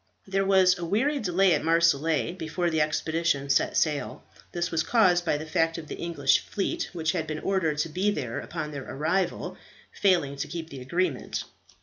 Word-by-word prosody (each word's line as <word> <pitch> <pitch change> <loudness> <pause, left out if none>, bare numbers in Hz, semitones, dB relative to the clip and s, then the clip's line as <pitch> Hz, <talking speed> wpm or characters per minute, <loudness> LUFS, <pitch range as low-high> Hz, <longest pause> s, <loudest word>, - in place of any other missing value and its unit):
There 195 0 +1
was 185 -2 +4
a - - -4
weary 260 - +1
delay 190 -3 +3
at 150 - 0
Marseilles 165 -1 +2
before 170 0 -2
the 160 -1 +1
expedition 155 -2 0
set - - +2
sail. 150 -3 -1 0.3
This 175 0 -2
was 165 -1 +1
caused 180 -2 +3
by 150 - +1
the 155 - -6
fact 165 +1 0
of 160 -2 -8
the - - -5
English 170 -1 +2
fleet, 195 - -3
which 165 -2 -1
had 165 -4 -2
been 155 0 -3
ordered 165 -4 0
to 155 +2 -1
be 185 +6 0
there 130 - -3
upon 160 -3 -5
their 140 -3 -6
arrival, 160 +7 -1 0.3
failing 170 -8 +1
to - - -3
keep 165 -2 -6
the 135 -2 -8
agreement. 160 +1 -2
165 Hz, 190 wpm, -27 LUFS, 155-185 Hz, 0.3 s, was